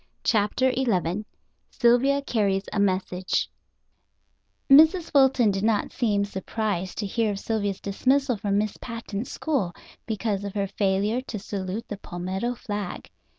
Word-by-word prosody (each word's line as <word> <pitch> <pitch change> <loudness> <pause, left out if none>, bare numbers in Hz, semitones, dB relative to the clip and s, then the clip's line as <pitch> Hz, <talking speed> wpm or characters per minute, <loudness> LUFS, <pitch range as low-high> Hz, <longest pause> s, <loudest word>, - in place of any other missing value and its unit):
CHAPTER 235 +4 +2
XI 210 -6 0 0.4
SYLVIA 270 +3 +3
CARRIES 200 -7 +1
A 210 - 0
MESSAGE 185 -1 0 1.2
Mrs. 320 +5 +6
Fulton 265 -5 +5
did 195 0 -2
not 220 -1 +1
seem 205 -5 +1
surprised 195 -2 -3
to 210 - -2
hear 220 +2 0
of 195 - -5
Sylvia's 205 -3 -2
dismissal 260 +6 +1
from 200 -1 -1
Miss 210 0 -1
Patten's 230 0 -6
school 260 - -1 0.3
because 210 -2 -1
of 200 0 -6
her 200 -1 +1
failure 200 +4 0
to 220 - -4
salute 195 +1 -5
the 205 - -5
palmetto 190 +6 -3
flag. 205 -5 -5
210 Hz, 135 wpm, -25 LUFS, 195-240 Hz, 1.2 s, Mrs